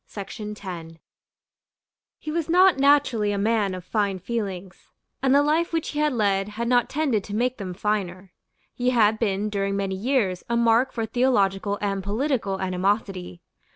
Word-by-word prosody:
He 305 - -6
was 330 0 -2
not 360 -2 +5
naturally 265 -7 +3
a 200 - -1
man 205 -2 +1
of 180 -1 -9
fine 200 -2 0
feelings; 190 -2 -5 0.3
and 265 0 +3
the 285 - +5
life 315 +3 +1
which 325 -1 -1
he 295 - -4
had 300 0 +2
led 200 -3 +1
had 230 +3 -4
not 245 -1 +2
tended 270 -9 0
to 205 - -5
make 250 +2 0
them 185 -3 -5
finer. 190 -2 -3 0.4
He 250 0 0
had 220 -3 +3
been 205 -2 0
during 200 -1 -1
many 195 -1 -2
years 195 -3 0
a 235 - +1
mark 235 +2 +3
for 225 -2 -2
theological 205 -5 +1
and 195 -1 -1
political 215 -2 -1
animosity. 185 -1 -2
210 Hz, 155 wpm, -24 LUFS, 195-255 Hz, 0.4 s, not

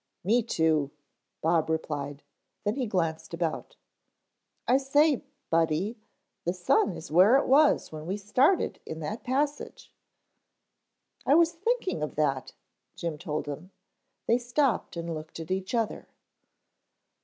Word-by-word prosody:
"Me 225 +7 +3
too," 160 -9 +1 0.5
Bob 165 0 +2
replied, 145 -3 -3 0.4
then 205 - +1
he 255 -1 -2
glanced 165 -4 -2
about. 165 -2 -3 0.9
"I 255 - +5
say, 285 +1 +3 0.3
Buddy, 165 +6 +1 0.5
the 175 +2 -1
sun 180 0 +2
is 160 - -9
where 190 - +7
it 275 - +1
was 290 +3 +4
when 155 0 -7
we 190 +3 -1
started 255 - +2
in 160 - -7
that 205 +9 -4
passage." 285 +3 -2 1.3
"I 280 - +4
was 335 0 +5
thinking 390 - -1
of 150 - -3
that," 135 -4 0 0.4
Jim 165 -3 -4
told 150 0 -3
him. 150 +5 -7 0.6
They 235 +2 +3
stopped 245 - 0
and 170 0 -3
looked 155 +1 -8
at 165 +2 -7
each 190 +4 -2
other. 225 -2 -1
185 Hz, 130 wpm, -28 LUFS, 160-255 Hz, 1.3 s, where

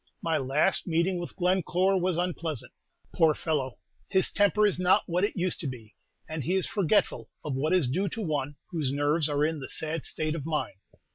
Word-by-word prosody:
My 165 -1 +1
last 140 +10 +1
meeting 175 +2 +1
with 175 - -7
Glencore 185 +1 +2
was 180 -1 0
unpleasant. 170 -6 -3 0.4
Poor 160 -2 +4
fellow! 140 -6 -2 0.3
his 190 -1 +2
temper 205 +1 +3
is 200 -3 +1
not 180 +1 +4
what 180 +2 0
it 205 - 0
used 180 0 0
to 155 - -3
be, 115 -5 -8 0.3
and 155 -2 -4
he 180 +7 0
is 190 - +1
forgetful 205 -1 +1 0.2
of 150 - -2
what 140 +4 0
is 180 -8 +4
due 185 +10 0
to 225 - -5
one 145 -4 -2 0.2
whose 155 -7 -1
nerves 145 +2 +2
are 145 0 +2
in 160 0 -1
the 135 - -7
sad 160 0 -2
state 155 -1 -1
of 160 -4 -4
mine. 150 -10 -3
165 Hz, 200 wpm, -28 LUFS, 150-185 Hz, 0.4 s, Poor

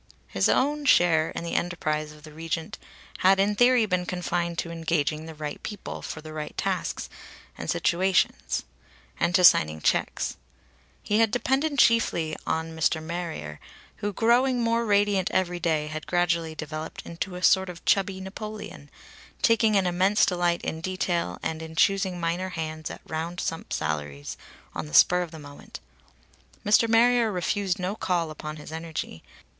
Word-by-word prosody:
His - - +1
own 290 +2 +1
share 170 - +4
in - - -5
the 170 - -4
enterprise 155 -3 -1
of 150 -1 -16
the 155 - -11
Regent 165 +1 -4 0.4
had 190 +1 +5
in 200 +2 +3
theory 245 +1 +4
been 180 -3 -1
confined 175 -1 -2
to 170 - -3
engaging 160 -2 -1
the 160 - -9
right 150 -1 -6
people 210 -3 -6
for 155 - -6
the 155 0 -9
right 155 -1 -6
tasks - - -2 0.5
and - - -6
situations; 185 +2 +1 0.6
and 175 +1 +2
to 185 - +4
signing 80 - +6
checks. - - 0 0.7
He 210 +1 +1
had 225 -1 +4
depended 270 +5 0
chiefly 225 -11 +3
upon 160 +1 -3
Mr. 160 0 +1
Marrier, 160 - -5 0.4
who, 205 - -2
growing 245 +4 +3
more 230 0 +1
radiant 205 -2 +2
every 180 -1 0
day, 160 -3 0
had 155 0 -6
gradually 170 -2 0
developed 155 +1 -6
into 180 +2 -5
a 180 - -7
sort 190 +2 +4
of 175 -1 -10
chubby 195 -1 +2
Napoleon, 210 +3 -8 0.5
taking 225 -1 +4
an 195 -2 +3
immense 185 +4 +3
delight 175 -1 0
in 160 - -3
detail 175 - -1
and 160 0 -3
in 160 0 -8
choosing 190 0 +2
minor 175 +2 -1
hands 155 -2 -5
at - - -9
round 165 +3 -4
sum 165 - -3
salaries 75 -2 -3 0.4
on 80 -2 -5
the 75 - -5
spur 180 - +6
of 175 - -4
the 160 - -10
moment. 145 -2 -11 0.9
Mr. 215 +3 +5
Marrier 235 0 +4
refused 190 +1 -1
no 185 +3 -2
call 175 -6 -1
upon 155 0 -7
his 150 0 -10
energy. 160 - -5
175 Hz, 160 wpm, -26 LUFS, 160-200 Hz, 0.9 s, signing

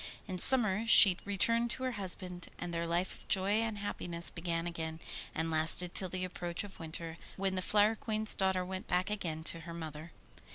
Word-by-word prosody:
In 185 -2 -5
summer 225 -2 +3
she 195 -5 +8
returned 230 +4 +1
to 260 - +1
her 255 - -1
husband, 185 -4 -5
and 175 - -6
their 170 0 -2
life 175 +2 -1
of - - -20
joy 195 +1 +3
and 225 -2 -3
happiness 175 -4 -1
began 170 -1 -4
again, 160 -2 -5 0.4
and 160 +1 -2
lasted 165 +3 +3
till 185 - +1
the 185 +1 -3
approach 175 0 -4
of 200 -1 -12
winter, 165 0 -6 0.2
when 195 0 -1
the 185 - -2
Flower 210 +3 +3
Queen's 215 -1 +4
daughter 190 -1 0
went 185 0 -6
back 185 +3 -1
again 165 -6 -4
to 165 - +1
her 165 +1 -9
mother. 160 0 -8
185 Hz, 195 wpm, -32 LUFS, 170-205 Hz, 0.4 s, she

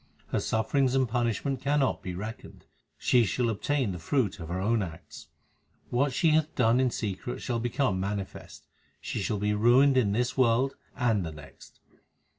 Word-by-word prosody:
Her - - 0
sufferings 125 +4 +1
and 130 -1 +2
punishment 120 +3 -1
cannot 140 -1 +1
be 90 -1 -5
reckoned; 105 +5 -8 0.3
she 125 -2 +3
shall 120 +4 0
obtain 130 +1 -1
the 90 - -6
fruit 105 - 0
of 80 - -7
her 90 +1 -2
own 110 +3 +1
acts 85 -4 -8 0.6
What 135 +3 +2
she 160 +6 +2
hath 155 0 +1
done 120 -1 +3
in 130 -1 +3
secret 110 +1 -4
shall 120 -2 -2
become 120 -4 0
manifest; 100 0 -5 0.3
she - - -4
shall 105 +2 -1
be 105 +1 0
ruined 125 +6 +5
in 110 -6 +3
this 120 +4 0
world 130 +1 +3 0.2
and 115 -6 +1
the 80 - -5
next. 75 -2 -14
115 Hz, 170 wpm, -28 LUFS, 100-130 Hz, 0.6 s, ruined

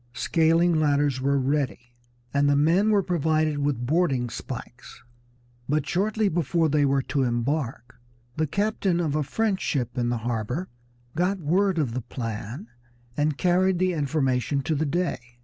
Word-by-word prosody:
Scaling 165 +3 +2
ladders 145 -3 +1
were 140 +1 +2
ready, 130 -3 -1 0.4
and 140 0 +3
the 145 - +4
men 170 +9 +3
were 205 -2 +3
provided 155 -3 +1
with 140 -4 -1
boarding 135 -5 +1
spikes; 125 0 -8 0.7
but 150 +2 0
shortly 210 +3 +1
before 165 -1 +1
they 145 0 +3
were 135 -1 +1
to 140 - -1
embark 120 -1 -2 0.3
the 155 0 0
captain 200 -1 0
of 155 -4 -1
a 155 - +1
French 205 +6 -1
ship 125 -3 -2
in 120 0 0
the 120 - 0
harbor 120 - -2 0.5
got 180 +4 +1
word 180 +4 +1
of 140 -8 0
the 130 - -2
plan 115 - -6 0.5
and 150 -1 0
carried 185 +2 +2
the 185 0 +1
information 140 -2 0
to 160 - -1
the 155 +1 0
Dey. 175 +4 -1
150 Hz, 155 wpm, -25 LUFS, 130-175 Hz, 0.7 s, the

